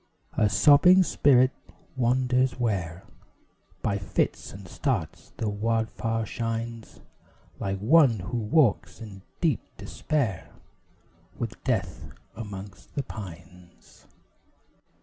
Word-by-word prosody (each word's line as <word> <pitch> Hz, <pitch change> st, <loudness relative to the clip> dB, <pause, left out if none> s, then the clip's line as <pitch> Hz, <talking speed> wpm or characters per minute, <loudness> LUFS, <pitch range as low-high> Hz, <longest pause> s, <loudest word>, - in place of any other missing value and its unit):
A 105 Hz, -, +2 dB
sobbing 150 Hz, -, +6 dB
spirit 130 Hz, -6 st, +4 dB, 0.4 s
wanders 125 Hz, +1 st, +1 dB
where 95 Hz, -7 st, -2 dB, 0.8 s
By 100 Hz, 0 st, 0 dB
fits 95 Hz, -, -2 dB
and 95 Hz, 0 st, -11 dB
starts 115 Hz, -, -3 dB
the 110 Hz, -, -2 dB
wild 110 Hz, +2 st, 0 dB
fire 115 Hz, 0 st, -2 dB
shines; 115 Hz, 0 st, -5 dB, 0.6 s
Like 95 Hz, 0 st, -2 dB
one 125 Hz, +3 st, +5 dB
who 105 Hz, +6 st, -4 dB
walks 115 Hz, +1 st, +2 dB
in 105 Hz, -4 st, -10 dB, 0.2 s
deep 160 Hz, -8 st, +2 dB, 0.2 s
despair, 115 Hz, -, -2 dB, 0.8 s
With 115 Hz, -2 st, -5 dB
Death 95 Hz, -10 st, -2 dB, 0.3 s
amongst 100 Hz, -3 st, -9 dB
the 140 Hz, -, -1 dB
pines. 90 Hz, -5 st, -12 dB
115 Hz, 100 wpm, -26 LUFS, 95-125 Hz, 0.8 s, sobbing